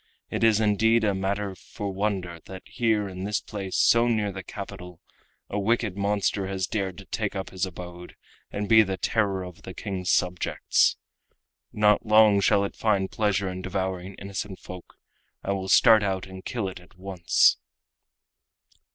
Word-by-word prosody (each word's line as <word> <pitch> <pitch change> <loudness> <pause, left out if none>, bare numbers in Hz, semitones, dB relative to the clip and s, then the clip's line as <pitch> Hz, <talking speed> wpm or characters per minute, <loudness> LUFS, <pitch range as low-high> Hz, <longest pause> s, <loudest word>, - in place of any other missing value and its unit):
It - - -2
is 110 -2 +5
indeed 110 +2 +3
a 105 -2 +2
matter 100 +1 -2
for 100 +2 -7
wonder 95 -4 -2
that 95 -1 -9
here 110 -4 0
in 95 -1 -7
this 105 +2 0
place, 95 -3 -6
so 115 +1 +4
near 105 -3 0
the 95 0 -6
capital, 90 0 -9 0.5
a 105 - -3
wicked 110 -1 0
monster 100 -1 0
has 95 -1 -2
dared 95 -2 -3
to 100 - -11
take 105 -1 -3
up 95 -1 -4
his 95 0 -2
abode 90 -1 -10 0.3
and 100 0 -4
be 110 0 +7
the 95 -3 -1
terror 100 0 0
of 90 -2 -10
the 95 - -9
King's 95 -4 -4
subjects. 90 -1 +2 0.7
Not 105 0 +3
long 110 -2 +5
shall 100 0 +3
it 100 - -4
find 100 -3 0
pleasure 105 -2 0
in 95 0 -5
devouring 95 0 -3
innocent 100 0 -6
folk. 90 0 -11 0.5
I 100 - -2
will 95 -1 -3
start 110 +1 +7
out 95 -2 -1
and 95 -1 -10
kill 115 -6 -3
it 95 - -7
at 90 +1 -20
once." 90 -2 +3
100 Hz, 170 wpm, -26 LUFS, 95-105 Hz, 0.7 s, be